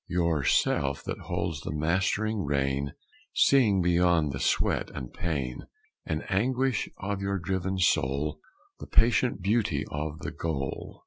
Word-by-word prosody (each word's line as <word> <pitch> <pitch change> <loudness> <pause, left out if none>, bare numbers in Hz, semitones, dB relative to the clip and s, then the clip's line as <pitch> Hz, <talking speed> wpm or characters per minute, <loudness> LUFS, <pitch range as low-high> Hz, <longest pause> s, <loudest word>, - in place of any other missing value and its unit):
Your 85 -4 +1
Self - - +1
that - - -4
holds 75 -4 -2
the - - -5
mastering 95 +7 0
rein, 70 -1 -1 0.4
Seeing 110 -9 +4
beyond 85 -3 +3
the 65 - -5
sweat - - +1
and 65 -3 -6
pain 70 -7 -3 0.4
And 75 0 -2
anguish 125 +4 +1
of 100 0 -3
your 100 0 -1
driven 95 +1 -2
soul, 75 -3 +1 0.4
The - - -8
patient 120 -4 +3
beauty 110 +3 +1
of 75 +1 -3
the - - -4
goal! 70 -5 -4
85 Hz, 135 wpm, -28 LUFS, 75-100 Hz, 0.4 s, Seeing